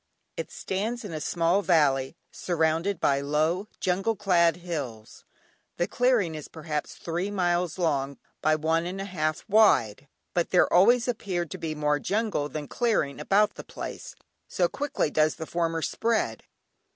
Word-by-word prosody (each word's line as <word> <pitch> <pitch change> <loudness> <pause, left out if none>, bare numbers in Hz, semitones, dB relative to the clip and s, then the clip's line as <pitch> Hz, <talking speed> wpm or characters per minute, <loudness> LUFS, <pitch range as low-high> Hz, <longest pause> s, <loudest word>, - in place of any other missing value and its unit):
It - - -5
stands 220 +5 -3
in 185 - -6
a 155 - -4
small 170 +5 +1
valley, 145 -6 +2 0.2
surrounded 165 +2 0
by 140 0 +2
low 155 +7 0
jungle 195 +4 0
clad 175 -4 +3
hills. 145 -11 -6 0.5
The 175 - +1
clearing 245 -9 +2
is 155 -2 -7
perhaps 155 -2 -5
three 175 +4 -3
miles 175 -4 0
long 140 -5 0 0.2
by 155 0 +3
one 160 +2 0
and 185 +2 -5
a 195 - -3
half 155 -5 -2
wide, 145 - +3 0.3
but 175 -1 0
there 180 - +3
always 235 +7 +5
appeared 185 -8 -2
to 185 - -6
be 160 -2 -3
more 150 -1 +1
jungle 205 -8 -1
than 150 -1 -5
clearing 215 - 0
about 200 +7 +3
the - - -9
place, - - -8 0.3
so - - +1
quickly 290 - -2
does 155 0 +2
the 160 - -6
former 165 -1 -1
spread. 220 - -1
170 Hz, 155 wpm, -27 LUFS, 155-195 Hz, 0.5 s, always